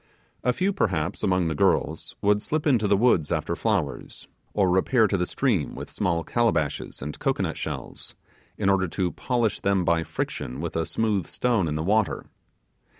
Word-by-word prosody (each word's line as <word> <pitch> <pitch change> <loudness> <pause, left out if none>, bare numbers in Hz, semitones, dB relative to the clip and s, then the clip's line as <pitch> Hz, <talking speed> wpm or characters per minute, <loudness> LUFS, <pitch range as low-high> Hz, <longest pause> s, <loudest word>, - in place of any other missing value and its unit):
A 125 - +3
few, 190 +10 0
perhaps, 90 - -1
among 90 -3 +2
the 80 - 0
girls, 75 - 0
would 105 0 +3
slip 155 +6 -2
into 120 -8 +3
the 100 0 +4
woods 95 -9 +3
after 80 +1 -1
flowers, 95 - -2 0.2
or 100 -2 +2
repair 95 +6 +3
to 105 - +1
the 90 -2 0
stream 110 - 0
will; - - -6
small 85 -2 -1
calabashes 85 - 0
and 75 +1 -6
cocoanut - - 0
shells, - - -6 0.4
in - - 0
order 95 -1 +3
to 90 +1 -1
polish 120 -4 0
them 100 -2 +1
by 85 0 +3
friction 65 -4 -4
with 85 +1 -4
a 80 -1 0
smooth 105 -6 0
stone 115 -8 +1
in 75 - -2
the 80 - -1
water. 105 +3 +1
95 Hz, 175 wpm, -25 LUFS, 85-110 Hz, 0.4 s, the